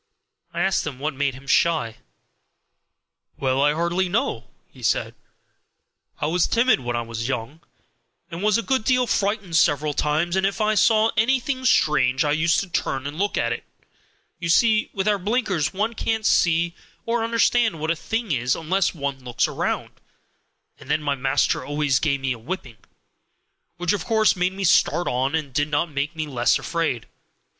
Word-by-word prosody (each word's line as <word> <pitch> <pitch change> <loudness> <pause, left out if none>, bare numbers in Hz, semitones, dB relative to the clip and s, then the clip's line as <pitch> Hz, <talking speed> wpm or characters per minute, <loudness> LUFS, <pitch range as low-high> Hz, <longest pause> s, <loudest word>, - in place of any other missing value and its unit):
I 170 - -3
asked 190 -3 +1
him 140 -5 -5
what 150 +3 -3
made 140 -1 -1
him 135 +1 -13
shy. 140 -6 +1 1.4
"Well, 135 0 0
I 145 +1 +3
hardly 170 +3 0
know," 155 - -1 0.2
he 130 - -17
said. 115 - 0 1.1
"I - - -1
was 165 +3 +1
timid 240 - +3
when 120 -2 -3
I 120 - -1
was 115 0 -5
young, 130 +4 -4 0.7
and 170 +2 -6
was 210 +1 +3
a 230 - -2
good 265 -2 0
deal 250 +1 +2
frightened 200 -5 -1
several 150 -2 +2
times, 155 +5 0
and 190 - +1
if 195 +3 0
I 215 0 +2
saw 220 +1 +4
anything 260 +3 0
strange 150 - +3
I 145 - +1
used 160 +2 +2
to 195 - -6
turn 135 -6 -2
and 145 +3 -6
look 205 +1 0
at 115 0 +1
it - - -7 0.8
you 170 -1 -3
see, 215 +5 +3
with 195 +1 -3
our 205 -1 +2
blinkers 200 - 0
one 210 +4 -1
can't 220 -1 -2
see 170 0 +2 0.3
or 230 0 0
understand 230 -4 +2
what 160 +2 -1
a - - 0
thing 225 +4 -3
is 125 -2 +1
unless 180 +3 0
one 140 -3 -4
looks 120 -2 0
round - - -3 0.8
and - - -14
then 150 +1 +1
my 145 -1 +1
master 135 -1 0
always 145 -1 0
gave 140 -3 0
me 135 -1 -1
a 120 - -10
whipping, 130 -3 -6 1.0
which 175 +1 0
of 200 - -3
course 220 -2 +3
made 180 +1 0
me 195 +1 -5
start 175 -1 +3
on, 130 +4 0
and 150 -5 -3
did 145 +2 +1
not 150 +2 -1
make 145 +3 -3
me 155 -1 -3
less 120 -5 +1
afraid. 160 -9 -2
165 Hz, 180 wpm, -23 LUFS, 140-205 Hz, 1.4 s, saw